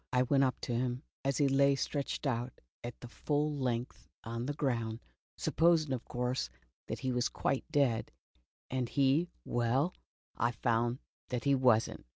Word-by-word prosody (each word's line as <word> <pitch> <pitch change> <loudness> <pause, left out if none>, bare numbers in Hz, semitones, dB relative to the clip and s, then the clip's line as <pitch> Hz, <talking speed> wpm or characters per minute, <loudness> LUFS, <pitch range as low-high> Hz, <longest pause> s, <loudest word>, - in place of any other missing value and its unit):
" - - -52
I 125 0 +4
went 135 +2 +3
up 130 -2 +1
to 120 - -2
him 125 +2 -1 0.2
as 135 0 +1
he 145 - +4
lay 140 +1 +4
stretched 140 +2 -2
out 125 -2 -2 0.2
at 120 0 -6
full 150 +4 -1
length 125 -3 -2 0.2
on 115 +2 -4
the 145 - -2
ground, 115 -6 -1 0.4
supposing, 160 -3 +3
of 125 - -3
course, 125 - -1 0.4
that - - -3
he 130 - 0
was 125 0 +1
quite 135 +3 -1
dead, 135 -7 +2 0.6
and 125 -2 -1
he 140 +5 +3
— - - -41
well, 125 +8 +1 0.4
I 120 +1 +1
found 120 +1 +1 0.3
that 125 -1 -2
he 140 -1 +4
was 125 -4 +5
lit. - - -9
130 Hz, 175 wpm, -33 LUFS, 120-140 Hz, 0.6 s, was